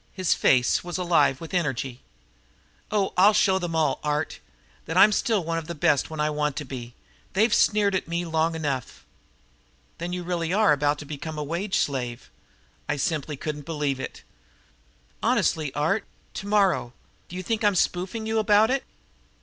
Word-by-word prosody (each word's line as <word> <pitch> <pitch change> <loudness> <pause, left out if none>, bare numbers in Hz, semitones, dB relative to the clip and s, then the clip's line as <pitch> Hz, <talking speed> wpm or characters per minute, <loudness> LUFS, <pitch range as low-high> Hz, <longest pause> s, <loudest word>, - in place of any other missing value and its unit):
His 185 -3 +1
face 125 -1 +3
was 175 0 -4
alive 165 -7 +2
with 165 +1 -9
energy. 135 -7 -2 0.9
"Oh, 205 -2 0
I'll 205 +3 +6
show 190 -1 +3
them 175 -2 -3
all, 150 -4 +1
Art, 150 +1 -2 0.5
that - - -2
I'm 215 - +8
still 210 -2 +1
one 165 0 -1
of 160 - -10
the 170 - -5
best 145 -1 +2
when 155 -1 -7
I 150 - +2
want 150 -1 -1
to 145 0 -4
be. 125 -2 -8 0.4
They've 215 +6 +3
sneered 205 -2 +3
at 190 - -1
me 170 +1 -2
long 165 0 0
enough." 140 -6 -4 0.9
"Then 170 +1 -4
you 180 0 -3
really 170 -1 -2
are 210 -5 +4
about 145 0 +1
to 145 - -9
become 155 +2 -6
a 150 - -2
wage 175 +7 -2
slave?" 125 -4 -2 0.6
I 150 - +1
simply 150 -1 -2
couldn't 150 0 -5
believe 150 -4 -1
it. - - -7 1.0
"Honestly, 155 -4 +1
Art. 160 +9 +1 0.3
Tomorrow. 195 - +1 0.4
Do 180 - -9
you 185 - -4
think 225 +2 -1
I'm 205 -2 +3
spoofing 185 +5 -1
you 220 0 0
about 215 +2 +4
it?" 270 0 0
165 Hz, 175 wpm, -25 LUFS, 145-190 Hz, 1.0 s, I'm